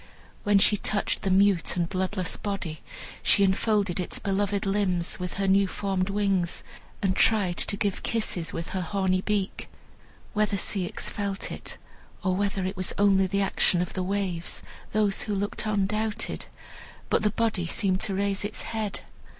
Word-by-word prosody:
When 205 -1 +4
she 205 +1 +5
touched 205 +1 -1
the 195 - -1
mute 190 -2 +3
and 170 -1 +1
bloodless 185 0 -1
body, 190 -7 -4 0.4
she 200 - +5
enfolded 195 -1 +2
its 180 - -1
beloved 200 0 0
limbs 190 -4 0
with 180 -1 -4
her 195 0 0
new 195 +1 +4
formed 190 0 -1
wings, 195 -4 0 0.4
and 190 -1 +2
tried 200 -6 +3
to 200 - +1
give 200 -2 -1
kisses 190 -7 -1
with 165 - -5
her 190 - -2
horny 185 0 +1
beak. 200 -1 -2 0.6
Whether 210 -1 +1
Ceyx 190 -1 -2
felt 200 -1 -3
it, - - -7 0.5
or 185 -1 +1
whether 195 -1 0
it 190 +1 -2
was 185 -1 -1
only 195 -2 +4
the 200 +2 0
action 190 -2 +3
of 180 - -2
the 185 - -2
waves, 185 -3 -2 0.3
those 210 -2 +2
who 210 - -2
looked 205 +2 -2
on 205 -2 +2
doubted, 215 +2 -2 0.6
but - - +3
the 210 - +3
body 215 -5 0
seemed 190 +1 +1
to 195 - -2
raise 200 0 0
its 205 - -3
head. 215 -3 -3
195 Hz, 165 wpm, -27 LUFS, 185-205 Hz, 0.6 s, she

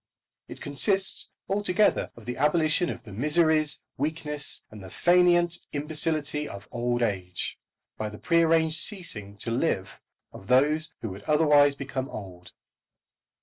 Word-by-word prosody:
It - - -11
consists 190 +7 +1 0.2
altogether 205 0 +1
of 115 - -15
the 125 +1 -4
abolition 155 +3 +2
of - - -7
the 105 -5 -12
miseries, 155 - +2 0.2
weakness, 150 0 0
and 105 -1 -11
fainéant 175 - +2
imbecility 150 0 -1
of 100 +1 -10
old 120 0 -1
age, 90 -5 -3 0.4
by 110 - -3
the 105 - -10
prearranged 165 0 +2
ceasing 115 - -2
to 115 - -3
live 110 -7 -2 0.3
of 95 - -13
those 150 +6 +3
who 110 - -3
would 95 +2 -9
otherwise 150 -2 +4
become 135 -1 -5
old. 90 -4 -10
150 Hz, 130 wpm, -26 LUFS, 115-165 Hz, 0.4 s, otherwise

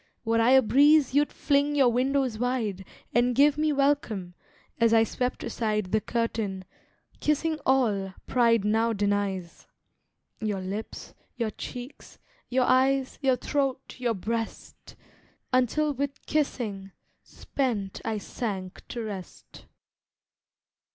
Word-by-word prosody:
Were 230 0 +2
I 230 - +4
a 265 0 +7
breeze 285 +3 +5
you'd 290 +1 +3
fling 285 0 +1
your 270 -4 +5
windows 255 -1 0
wide, 225 -6 -1 0.3
And 240 +1 +2
give 285 +2 +5
me 305 0 +1
welcome, 275 -10 0 0.5
as 230 -1 +4
I 225 - +6
swept 250 +3 -2
aside 215 -4 -2
The 215 - +2
curtain, 220 -5 -2 0.5
kissing 305 +1 0
all 210 -8 +1
pride 230 -4 +3
now 225 +2 +2
denies, 200 -3 -2 0.7
Your 210 -3 -2
lips, 195 +4 -6 0.2
your 230 -3 -1
cheeks, 245 +5 -9 0.3
your 255 0 +2
eyes, 260 +1 +2
your 265 -2 +3
throat, 270 0 -2
your 240 -2 0
breast, 225 +4 -5 0.6
Until 285 +4 +2
with 280 0 -4
kissing 215 -10 -2 0.3
spent 220 -8 -3
I 225 -1 -2
sank 195 -3 -5
to 235 -2 -5
rest. 195 -5 -9
235 Hz, 120 wpm, -27 LUFS, 210-270 Hz, 0.7 s, a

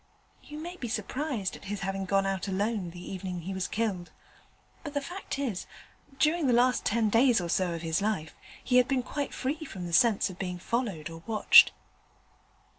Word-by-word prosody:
You 300 - -10
may 345 +3 -7
be 245 - -5
surprised 250 -3 -3
at - - -13
his 205 +1 -4
having 195 0 -2
gone 195 +1 +2
out 195 0 -2
alone 200 -1 -1
the 175 +1 -9
evening 185 -2 -5
he 190 +4 -5
was 190 -1 -2
killed, 200 -6 -2 0.7
but 290 -2 -7
the - - +2
fact 350 +2 -6
is 235 -10 -3 0.4
that 270 - -22
during 305 +2 +2
the 250 - +3
last 250 +1 +3
ten 225 0 +2
days 240 0 +5
or 175 -1 -4
so 180 -1 +1
of 165 - -7
his 165 +3 0
life 200 -7 -1 0.3
he 250 - +3
had 250 0 +5
been 265 -3 0
quite 285 +2 -3
free 295 +5 -3
from 190 - -7
the 170 - -6
sense 215 +3 +4
of 185 -2 -9
being 180 -2 -3
followed 185 -6 -3
or 165 0 -9
watched.' 220 -2 +7
210 Hz, 200 wpm, -29 LUFS, 185-260 Hz, 0.7 s, watched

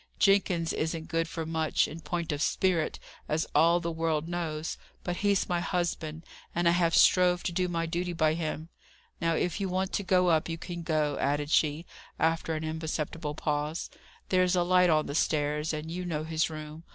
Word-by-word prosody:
Jenkins 190 -4 +3
isn't 160 0 -3
good 165 0 0
for 165 0 -4
much, 160 -1 +1
in 160 - -8
point 165 +2 -3
of 145 -1 -2
spirit, 175 -1 +1 0.3
as 155 +1 +1
all 165 +3 +5
the 170 -1 -3
world 160 -1 -1
knows; 165 -2 -3 0.2
but 175 -1 -2
he's 200 -2 +2
my 175 -1 0
husband, 170 -3 -2 0.3
and 175 0 +2
I - - +6
have 170 -1 +2
strove 180 -1 +5
to - - -1
do 180 +1 0
my 165 -1 -1
duty 175 +2 -2
by 155 -2 +2
him. 160 0 -4 0.5
Now, 165 -1 +2
if 180 +4 -1
you 195 - -1
want 185 +1 -1
to - - +1
go 185 -2 +3
up, 160 0 +2
you 165 - -3
can 170 +1 -6
go," 155 -3 0
added 145 +1 0
she, 155 +2 +2 0.3
after 165 0 +1
an 155 - -3
imperceptible 155 -1 -3
pause. 150 +2 -2 0.4
"There's 185 -1 +3
a 175 - +3
light 180 0 +4
on 155 -1 +3
the - - -5
stairs, 150 0 0
and 155 +1 -5
you 180 +2 -3
know 160 -4 -2
his 160 0 0
room. 155 0 -8
165 Hz, 195 wpm, -29 LUFS, 155-175 Hz, 0.5 s, I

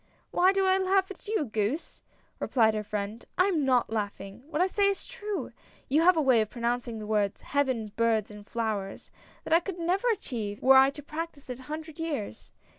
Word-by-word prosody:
" - - -36
Why 365 +2 +5
do 390 0 +1
I 380 0 +4
laugh 380 0 +2
at 395 - -12
you, 425 -8 0
goose! 220 +6 -2 0.2
" - - -39
replied 225 -4 +3
her 215 - -1
friend. 210 +2 -4
" - - -43
I 365 - +5
am 345 -7 +1
not 255 -4 +2
laughing. 205 0 -4
What 315 - -2
I 365 - +5
say 400 +1 +2
is 395 - -3
true. 425 -5 -5 0.4
You 295 +4 +4
have 355 0 +5
a 315 - +3
way 255 -5 +5
of 215 - -2
pronouncing 235 -1 -2
the 215 - -6
words 210 -2 0
'Heaven, 260 -7 -1
birds, 225 -2 +1
and 210 0 -12
flowers 215 -4 -3 0.2
' - - -27
that - - -1
I 330 - +7
could 360 +1 -6
never 360 +7 0
achieve 225 - -3
were 265 +1 +6
I 265 +1 +7
to 290 +1 -9
practice 305 -3 -6
it 250 - -6
a 260 - -14
hundred 315 +1 -6
years. 285 - -4
265 Hz, 225 wpm, -28 LUFS, 220-350 Hz, 0.4 s, I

